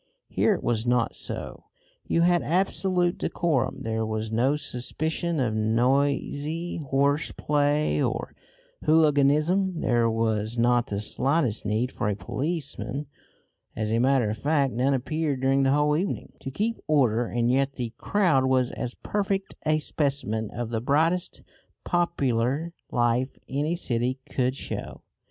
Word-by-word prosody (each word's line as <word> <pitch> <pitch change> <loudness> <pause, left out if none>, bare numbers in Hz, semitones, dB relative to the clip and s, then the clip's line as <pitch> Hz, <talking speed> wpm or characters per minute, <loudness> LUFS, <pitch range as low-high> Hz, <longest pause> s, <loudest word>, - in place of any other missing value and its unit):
Here 215 - +2
it - - -7
was 115 0 0
not 120 -1 +1
so. - - -5 0.4
You 165 - +2
had 175 0 +4
absolute 180 0 +1
decorum; 135 -4 -1
there 110 -1 -1
was 110 0 -3
no 125 +6 +2
suspicion 155 +4 -2
of 120 -4 0
noisy 140 +8 0
horseplay 145 - +1
or - - -2 0.5
hooliganism; 155 +4 +3
there 120 -1 +2
was 110 0 -1
not 120 0 +3
the 100 0 -3
slightest 130 -1 0
need 110 +5 0
for 105 - -2
a 105 - 0
policeman 145 - -3 0.7
(as 110 0 -2
a 115 - +2
matter 130 -3 +3
of 110 - -5
fact 140 0 +1
none 130 +4 +2
appeared 145 +2 -1
during 135 +1 +3
the 135 0 +3
whole 150 +1 +3
evening) 185 +5 -3
to - - -6
keep 215 - -2
order; 125 -6 +2
and 120 +1 0
yet 135 +1 +1
the 120 -4 -5
crowd 170 -11 +2
was 130 -1 +2
as 125 0 -5
perfect 200 -1 -1
a 155 0 +3
specimen 140 -8 -1
of 120 -1 -5
the 110 -1 -1
brightest 160 +7 +1 0.4
popular 145 -3 0 0.2
life 120 +2 +1
any 150 +5 -1
city 125 -5 0
could 130 -3 -1
show. - - -6
135 Hz, 140 wpm, -26 LUFS, 120-155 Hz, 0.7 s, had